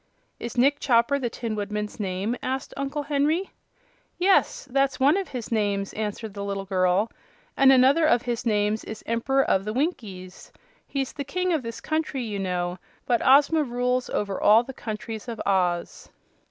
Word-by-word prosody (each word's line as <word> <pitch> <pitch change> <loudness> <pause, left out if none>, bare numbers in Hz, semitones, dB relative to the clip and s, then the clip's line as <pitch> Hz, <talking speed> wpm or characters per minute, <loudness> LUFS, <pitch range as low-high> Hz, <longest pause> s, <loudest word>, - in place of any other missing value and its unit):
"Is 235 +1 -6
Nick 280 +4 +3
Chopper 245 +2 +3
the 245 -3 -2
Tin 230 -1 -4
Woodman's 210 +1 -4
name?" 195 +3 -2
asked 265 +1 -3
Uncle 275 +2 -3
Henry. 300 +6 0 0.7
"Yes; 375 -3 +2
that's 275 +1 +1
one 280 +5 +5
of 390 -1 -1
his 245 -3 -6
names," 205 -3 0
answered 215 0 -4
the 200 0 -5
little 200 -1 -3
girl; 185 +2 +1 0.4
"and 270 0 +6
another 270 +5 +5
of 240 -6 +3
his 240 -1 -2
names 210 -1 +1
is 220 - -8
'Emp'ror 270 +4 +1
of 190 - +2
the 215 +1 -4
Winkies.' 210 - -4 0.4
He's 270 -2 -3
the 285 - -4
King 365 +6 -1
of 315 - +1
this 230 -1 -6
country, 310 -2 -2
you 210 -3 -4
know, 180 -1 -2 0.3
but 240 -2 +1
Ozma 290 +4 +5
rules 250 -1 -1
over 200 -2 -2
all 220 +3 +6
the 265 - -9
countries 220 -1 -6
of 230 -2 -5
Oz." 180 -3 0
235 Hz, 170 wpm, -25 LUFS, 205-275 Hz, 0.7 s, and